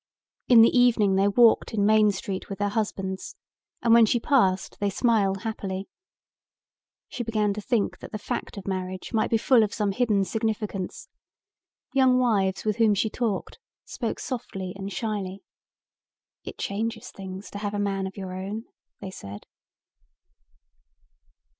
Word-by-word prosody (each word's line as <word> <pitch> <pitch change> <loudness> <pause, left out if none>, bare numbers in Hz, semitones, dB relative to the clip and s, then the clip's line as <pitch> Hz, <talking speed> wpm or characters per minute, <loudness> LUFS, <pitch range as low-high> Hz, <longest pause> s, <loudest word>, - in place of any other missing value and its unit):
In 235 -3 +8
the 230 - +4
evening 235 -5 +4
they 195 +1 +3
walked 230 +1 +4
in 200 -1 +2
Main 215 0 +5
Street 190 0 -5
with 195 - -5
their 205 0 0
husbands 195 -3 -3 0.5
and 230 -1 +5
when 230 -1 +7
she 240 - +2
passed 210 -9 +1
they 205 - +1
smiled 200 -2 +1
happily. 195 -3 -4 1.2
She 240 - -5
began 215 -3 0
to 210 - -5
think 225 -1 -1
that - - -10
the 215 - -3
fact 205 - -5
of 200 - -7
marriage 185 0 -4
might 220 -1 +1
be 225 - +3
full 240 +1 +4
of 210 -2 0
some 210 -2 0
hidden 205 -2 +1
significance. 210 -2 -3 0.9
Young 260 -2 +4
wives 205 -7 +1
with 215 0 0
whom 220 -3 +4
she 215 +2 0
talked 225 -5 -3 0.3
spoke - - -4
softly 195 -8 -5
and 195 +1 -6
shyly. 200 -2 -4 1.0
"It - - -8
changes 220 +2 -3
things 190 0 -8
to 205 - -6
have 205 0 -3
a - - -1
man 195 -1 -1
of 190 - -10
your 190 -2 -6
own," 200 +5 -5 0.4
they 195 -2 -6
said. 100 - -9
205 Hz, 155 wpm, -26 LUFS, 195-225 Hz, 1.2 s, In